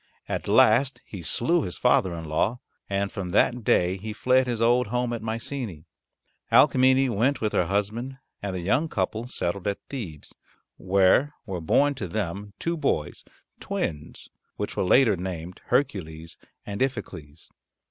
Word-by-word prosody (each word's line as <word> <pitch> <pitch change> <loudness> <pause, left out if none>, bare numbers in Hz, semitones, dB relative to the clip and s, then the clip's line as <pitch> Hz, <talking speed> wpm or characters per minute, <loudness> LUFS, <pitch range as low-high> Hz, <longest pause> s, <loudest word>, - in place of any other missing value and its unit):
At - - -3
last 125 +5 +4
he 100 - -8
slew 145 - +1
his 90 - -4
father 90 -3 +2
in 80 -1 -6
law, 95 +10 0 0.3
and 100 0 -1
from 95 -5 -5
that 120 +5 +2
day 90 -1 +2
he 105 +3 -6
fled 130 +3 +2
his 120 -2 -2
old 120 +1 +3
home 125 +2 -1
at 115 - -4
Mycenae. 115 - -5 0.7
Alcmene 130 0 +5
went 120 +6 +1
with 110 -1 -1
her 90 - +2
husband 110 +7 -2 0.2
and 100 -2 -3
the 90 - -3
young 130 - +1
couple 110 +3 -2
settled 95 -5 -2
at 100 - 0
Thebes, 95 - -7 0.4
where 100 +10 +3
were 95 -5 -4
born 145 - +3
to 105 -8 -5
them 100 +2 -4
two 170 +1 -2
boys 80 - -1 0.4
twins 75 -2 -4 0.3
which - - -4
were - - 0
later 110 +3 +5
named 90 -1 -6
Hercules 80 - -1 0.3
and 100 0 -5
Iphicles. 90 - -4
105 Hz, 155 wpm, -25 LUFS, 90-125 Hz, 0.7 s, Alcmene